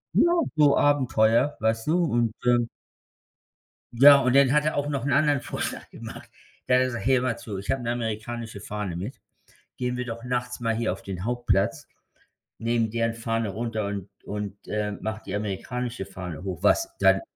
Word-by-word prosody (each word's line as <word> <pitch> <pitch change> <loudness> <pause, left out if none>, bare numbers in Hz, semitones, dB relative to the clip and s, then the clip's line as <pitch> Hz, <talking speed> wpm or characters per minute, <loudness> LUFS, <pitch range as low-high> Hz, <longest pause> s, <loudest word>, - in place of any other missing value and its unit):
Ja, 345 - +5 0.2
so 150 -2 +5
Abenteuer, 130 -2 +3
weißt 110 +3 0
du, 165 +3 +3
und, 120 -6 +1
ähm 120 -1 +3 1.3
Ja, 140 +3 +9
und 125 0 +2
dann 140 -2 +6
hat 150 +1 +3
er 155 - 0
auch 145 0 -1
noch 140 -3 -2
'n 140 - 0
anderen 145 -2 +3
Vorschlag - - -4
gemacht. - - -9 0.4
Da 125 - +1
hat 130 - +5
er - - +3
gesagt: 120 -5 -4
„Hey 135 +1 +5
hör 125 - +2
mal 125 -2 -1
zu, 105 -4 -6
ich 100 - -9
habe 135 -2 0
'ne 120 - -1
amerikanische 115 -1 -4
Fahne 105 -4 -4
mit. 100 +9 -6 0.5
Gehen 125 0 -2
wir 125 - -3
doch 115 0 -6
nachts 125 0 -3
mal 115 -1 +1
hier 115 -4 0
auf 95 - -10
den 95 -1 -6
Hauptplatz, 115 -3 0 0.7
nehmen 115 -1 0
deren 115 0 0
Fahne 115 -1 -2
runter 110 +1 -3
und 100 -1 -5 0.2
und, 105 -1 -6
äh, 105 -1 -1
macht 110 0 -5
die - - -3
amerikanische 115 +3 -3
Fahne 90 -3 -7
hoch. 95 -3 -5
Was 335 - +3
dann?“ - - +5
115 Hz, 190 wpm, -26 LUFS, 105-125 Hz, 1.3 s, Ja